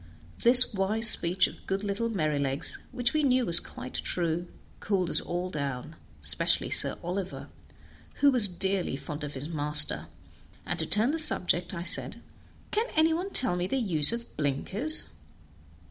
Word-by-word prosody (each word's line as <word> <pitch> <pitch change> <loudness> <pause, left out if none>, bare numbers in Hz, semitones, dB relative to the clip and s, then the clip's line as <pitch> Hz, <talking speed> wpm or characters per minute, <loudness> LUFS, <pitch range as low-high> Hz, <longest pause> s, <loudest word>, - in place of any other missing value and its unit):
This 245 0 +6
wise 210 +4 +1
speech 180 -3 +1
of - - -10
good 195 +1 -4
little 205 +3 -4
Merrylegs, 150 -8 -3
which 245 -1 -2
we 310 - -1
knew 255 -3 0
was 170 -3 +9
quite 125 - -11
true, 175 0 -3 0.3
cooled 185 -5 -3
us 155 - +4
all 180 +1 -6
down, 140 0 -7 0.3
especially 75 +1 0
Sir - - +3
Oliver, 185 +2 -7 0.7
who 285 0 +2
was 245 -6 +4
dearly 190 -2 -3
fond 150 +2 -9
of 145 -1 -8
his 135 +3 -7
master; 150 -2 +6 0.6
and - - -5
to - - +2
turn 225 +6 0
the 325 - -2
subject 180 - 0
I 170 - -7
said, - - 0 0.5
"Can 440 +3 -2
any 320 +1 +2
one 360 +4 -5
tell 255 - 0
me 180 0 -4
the 270 - -4
use 170 - +6
of 235 0 -7
blinkers?" 190 - -2
185 Hz, 160 wpm, -26 LUFS, 155-235 Hz, 0.7 s, was